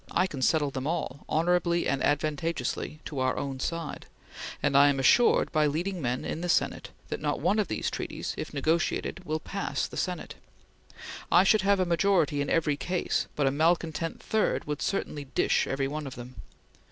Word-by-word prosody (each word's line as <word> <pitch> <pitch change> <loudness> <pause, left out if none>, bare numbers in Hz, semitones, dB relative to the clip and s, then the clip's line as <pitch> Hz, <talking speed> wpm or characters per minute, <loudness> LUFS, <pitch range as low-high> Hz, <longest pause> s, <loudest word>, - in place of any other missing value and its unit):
I - - +2
can 145 -8 -6
settle 145 +1 +2
them 130 +1 -4
all, 155 -4 -3
honorably 170 +1 +2
and 135 - 0
advantageously 155 0 -1
to 145 - -5
our 130 0 +1
own 135 -2 -3
side; 165 +2 -4 0.6
and 145 -2 +2
I 140 +1 +8
am 140 -1 0
assured 235 - +4
by 155 -2 +3
leading 175 +5 -2
men 125 -1 -2
in 160 - -3
the 175 - -3
Senate - - +1 0.2
that - - -3
not - - -1
one 215 - +2
of 205 - +1
these 110 - -2
treaties, - - -4
if - - -5
negotiated, 160 +5 -1
will 155 0 -1
pass 195 +5 -3
the - - -9
Senate. 180 -3 -3 1.0
I 175 - +7
should 210 +1 +4
have 200 0 +3
a 185 - +2
majority 170 -4 +2
in 140 - -2
every 150 -3 +1
case, 180 +3 -1
but 145 - +1
a 135 - +3
malcontent 165 +2 0
third 220 -1 0
would 150 0 -4
certainly 150 -7 -2
dish 130 - +1
every 135 0 -1
one 150 +1 -4
of 130 - -7
them. 125 +1 -9
155 Hz, 190 wpm, -28 LUFS, 140-175 Hz, 1.0 s, I